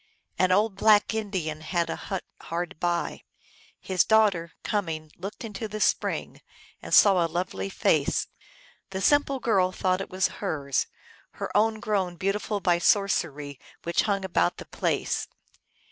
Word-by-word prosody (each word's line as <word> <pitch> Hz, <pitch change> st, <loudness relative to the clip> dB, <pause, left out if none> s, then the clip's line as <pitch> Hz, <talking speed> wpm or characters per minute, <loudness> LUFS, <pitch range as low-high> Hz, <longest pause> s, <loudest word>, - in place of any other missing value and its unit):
An 185 Hz, 0 st, +3 dB
old 205 Hz, +1 st, +2 dB
black 215 Hz, 0 st, +4 dB
Indian 185 Hz, -8 st, -3 dB
had 170 Hz, +1 st, -1 dB
a -, -, -3 dB
hut 190 Hz, -2 st, -5 dB, 0.2 s
hard 170 Hz, 0 st, -4 dB
by. 175 Hz, -1 st, -1 dB, 0.6 s
His 185 Hz, -3 st, +2 dB
daughter, 200 Hz, -7 st, +3 dB
coming, 160 Hz, -7 st, -2 dB
looked 195 Hz, +6 st, -7 dB
into 220 Hz, -1 st, -5 dB
the 215 Hz, +1 st, -6 dB
spring, -, -, 0 dB, 0.4 s
and -, -, -9 dB
saw 195 Hz, -4 st, +6 dB
a 165 Hz, -, -1 dB
lovely 155 Hz, -, -3 dB
face. -, -, +1 dB, 0.6 s
The 190 Hz, -, -4 dB
simple 280 Hz, +4 st, +3 dB
girl 195 Hz, -6 st, +2 dB
thought 185 Hz, 0 st, 0 dB
it -, -, -6 dB
was 185 Hz, +1 st, +1 dB
hers, 140 Hz, -, -1 dB, 0.5 s
her -, -, -6 dB
own 220 Hz, +1 st, +3 dB
grown 195 Hz, -5 st, -1 dB
beautiful 200 Hz, +3 st, -1 dB
by 175 Hz, -2 st, +2 dB
sorcery 150 Hz, -8 st, +1 dB, 0.2 s
which 170 Hz, 0 st, +1 dB
hung 195 Hz, -1 st, 0 dB
about 170 Hz, -, +1 dB
the -, -, -8 dB
place. -, -, -1 dB
190 Hz, 145 wpm, -26 LUFS, 170-205 Hz, 0.6 s, saw